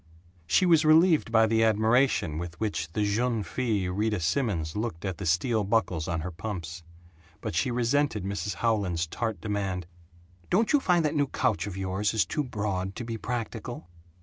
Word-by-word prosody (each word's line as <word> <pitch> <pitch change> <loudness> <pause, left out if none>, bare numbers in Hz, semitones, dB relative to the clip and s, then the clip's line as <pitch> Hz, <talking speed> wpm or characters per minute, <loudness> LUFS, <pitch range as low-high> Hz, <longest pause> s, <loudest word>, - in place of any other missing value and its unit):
She 185 - +4
was 165 -3 +5
relieved 155 -3 +5
by 110 -1 +5
the 110 0 +2
admiration 110 - +2
with 85 0 -7
which 85 -7 -2
the 105 - 0
jeune 110 +2 0
fille 100 -1 -1
Rita 105 +1 0
Simons 85 - -1
looked 105 -5 -3
at 95 -3 -3
the 95 - -3
steel 110 +7 +2
buckles 95 -6 0
on 85 -2 -1
her 90 +3 -4
pumps; 85 -2 -6 0.6
but - - -4
she 80 +9 +1
resented 120 -2 +1
Mrs. 100 0 -3
Howland's 100 -8 0
tart 110 +3 -3
demand, 95 -3 -2 0.6
"Don't 220 +8 +2
you 290 - +6
find 175 - +2
that 150 - +1
new 145 -2 +1
couch 120 -6 0
of 95 -2 -6
yours 95 +3 -1
is 110 - +3
too 150 - -2
broad 100 -6 -3
to 120 - -5
be 115 -1 -4
practical?" 115 -4 -5
105 Hz, 175 wpm, -27 LUFS, 90-120 Hz, 0.6 s, you